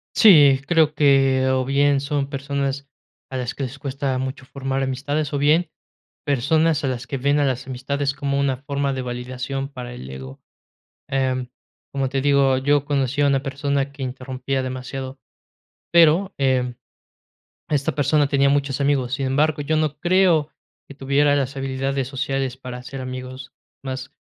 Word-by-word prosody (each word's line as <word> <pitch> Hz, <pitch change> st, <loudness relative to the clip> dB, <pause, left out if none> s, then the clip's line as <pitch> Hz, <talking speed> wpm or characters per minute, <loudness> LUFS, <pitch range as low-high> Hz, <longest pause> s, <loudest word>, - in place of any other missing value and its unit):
Sí, 145 Hz, -10 st, +7 dB
creo 160 Hz, -2 st, +3 dB
que, 135 Hz, -3 st, +4 dB
o 130 Hz, 0 st, +1 dB
bien, 140 Hz, +1 st, +3 dB
son 140 Hz, -1 st, -2 dB
personas 140 Hz, 0 st, -3 dB, 0.4 s
a 130 Hz, -, -3 dB
las 125 Hz, 0 st, -3 dB
que -, -, -6 dB
les 135 Hz, +1 st, -5 dB
cuesta 135 Hz, -1 st, -2 dB
mucho 130 Hz, +1 st, -4 dB
formar 135 Hz, 0 st, -3 dB
amistades, 140 Hz, +3 st, -2 dB
o 145 Hz, -, 0 dB
bien, 155 Hz, +4 st, +3 dB, 0.6 s
personas 150 Hz, +3 st, +2 dB
a -, -, +1 dB
las 125 Hz, -1 st, -4 dB
que 135 Hz, -, -3 dB
ven 140 Hz, +3 st, +1 dB
a 145 Hz, -, +3 dB
las 130 Hz, -2 st, -2 dB
amistades 140 Hz, +2 st, -2 dB
como 140 Hz, -1 st, -1 dB
una 135 Hz, -2 st, 0 dB
forma 140 Hz, 0 st, -2 dB
de 130 Hz, -, -3 dB
validación 125 Hz, +2 st, -4 dB
para 125 Hz, -3 st, -8 dB
el 65 Hz, -, -9 dB
ego. 65 Hz, 0 st, -9 dB, 0.7 s
Em, 130 Hz, -2 st, -1 dB, 0.4 s
como 135 Hz, -1 st, -1 dB
te 135 Hz, 0 st, -1 dB
digo, 140 Hz, -1 st, +3 dB
yo 145 Hz, +1 st, +2 dB
conocí 140 Hz, -1 st, -1 dB
a 145 Hz, -, +4 dB
una 135 Hz, -1 st, +1 dB
persona 140 Hz, 0 st, -1 dB
que 140 Hz, 0 st, -12 dB
interrumpía 130 Hz, +1 st, -3 dB
demasiado, 130 Hz, +1 st, -6 dB, 0.7 s
pero, 170 Hz, +3 st, +5 dB
em, 130 Hz, -3 st, +1 dB, 0.9 s
esta 140 Hz, -2 st, 0 dB
persona 145 Hz, 0 st, +2 dB
tenía 140 Hz, -1 st, +3 dB
muchos 140 Hz, -1 st, 0 dB
amigos. 135 Hz, -3 st, +1 dB
Sin 135 Hz, -1 st, -2 dB
embargo, 145 Hz, +3 st, +1 dB
yo 155 Hz, +2 st, 0 dB
no 150 Hz, -1 st, -1 dB
creo 175 Hz, -4 st, +3 dB, 0.4 s
que 140 Hz, -, -10 dB
tuviera 140 Hz, +1 st, +2 dB
las 140 Hz, -1 st, -1 dB
habilidades 135 Hz, 0 st, -2 dB
sociales 135 Hz, -1 st, -2 dB
para 125 Hz, -1 st, -7 dB
hacer 130 Hz, +2 st, -8 dB
amigos, 130 Hz, 0 st, -7 dB, 0.3 s
más 130 Hz, -1 st, -6 dB
135 Hz, 165 wpm, -22 LUFS, 130-145 Hz, 0.9 s, Sí